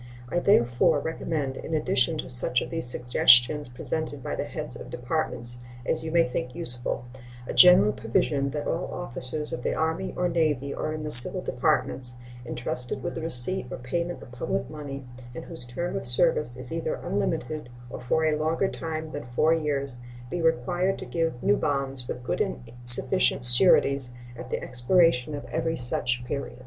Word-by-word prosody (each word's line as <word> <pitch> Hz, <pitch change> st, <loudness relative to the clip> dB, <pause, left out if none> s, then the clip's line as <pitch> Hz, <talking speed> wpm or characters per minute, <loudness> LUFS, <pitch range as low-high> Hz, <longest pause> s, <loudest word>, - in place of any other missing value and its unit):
I 175 Hz, -, +1 dB
therefore 125 Hz, -, +4 dB
recommend, 145 Hz, -3 st, -3 dB
in 160 Hz, -, -3 dB
addition 155 Hz, 0 st, +1 dB
to -, -, -4 dB
such 125 Hz, 0 st, -1 dB
of -, -, -8 dB
the 165 Hz, -1 st, -2 dB
suggestions 125 Hz, +3 st, +4 dB
presented 145 Hz, +2 st, -4 dB
by -, -, -3 dB
the -, -, -2 dB
heads -, -, -6 dB
of -, -, -9 dB
Departments 120 Hz, -2 st, -1 dB, 0.3 s
as 160 Hz, +5 st, -1 dB
you 160 Hz, -, -3 dB
may 165 Hz, +1 st, +3 dB
think 125 Hz, 0 st, -4 dB
useful, 125 Hz, -6 st, -2 dB, 0.4 s
a -, -, -4 dB
general 180 Hz, -, +7 dB
provision 135 Hz, +6 st, 0 dB
that 145 Hz, +1 st, -4 dB
all 170 Hz, +2 st, -2 dB
officers 150 Hz, -1 st, -5 dB
of 125 Hz, -, -3 dB
the -, -, -1 dB
Army 160 Hz, +4 st, -1 dB
or 180 Hz, -, +2 dB
Navy, 150 Hz, -5 st, 0 dB
or -, -, -3 dB
in 155 Hz, 0 st, -4 dB
the 150 Hz, -, -4 dB
civil 120 Hz, -3 st, +7 dB
departments, 125 Hz, -1 st, 0 dB, 0.3 s
intrusted 125 Hz, +1 st, -4 dB
with 175 Hz, -, -3 dB
the 165 Hz, -, -5 dB
receipt 160 Hz, +1 st, 0 dB
or -, -, -5 dB
payment 170 Hz, +8 st, -3 dB
of 120 Hz, -, -13 dB
public 125 Hz, -, -3 dB
money, 140 Hz, -3 st, -7 dB, 0.3 s
and -, -, -7 dB
whose 125 Hz, -, -8 dB
term 175 Hz, +9 st, -3 dB
of -, -, -2 dB
service -, -, +3 dB
is -, -, -9 dB
either 485 Hz, 0 st, -2 dB
unlimited 155 Hz, -5 st, -2 dB, 0.2 s
or -, -, -6 dB
for 160 Hz, +6 st, +1 dB
a 155 Hz, -1 st, +2 dB
longer 160 Hz, +5 st, +1 dB
time 160 Hz, -1 st, -5 dB
than 145 Hz, -, -6 dB
four 160 Hz, +4 st, +4 dB
years, 140 Hz, -5 st, -2 dB, 0.3 s
be 175 Hz, -, -2 dB
required 175 Hz, +5 st, +1 dB
to -, -, -7 dB
give 165 Hz, -7 st, -2 dB
new 105 Hz, -, +4 dB
bonds, 135 Hz, -4 st, -1 dB
with 125 Hz, -, -5 dB
good -, -, -1 dB
and -, -, -3 dB
sufficient 120 Hz, -, +2 dB
sureties, 135 Hz, 0 st, +4 dB, 0.3 s
at -, -, -9 dB
the -, -, -3 dB
expiration 135 Hz, +2 st, +2 dB
of 145 Hz, -, -7 dB
every 165 Hz, 0 st, -1 dB
such 125 Hz, 0 st, -2 dB
period. 130 Hz, -1 st, -4 dB
145 Hz, 180 wpm, -26 LUFS, 125-165 Hz, 0.4 s, general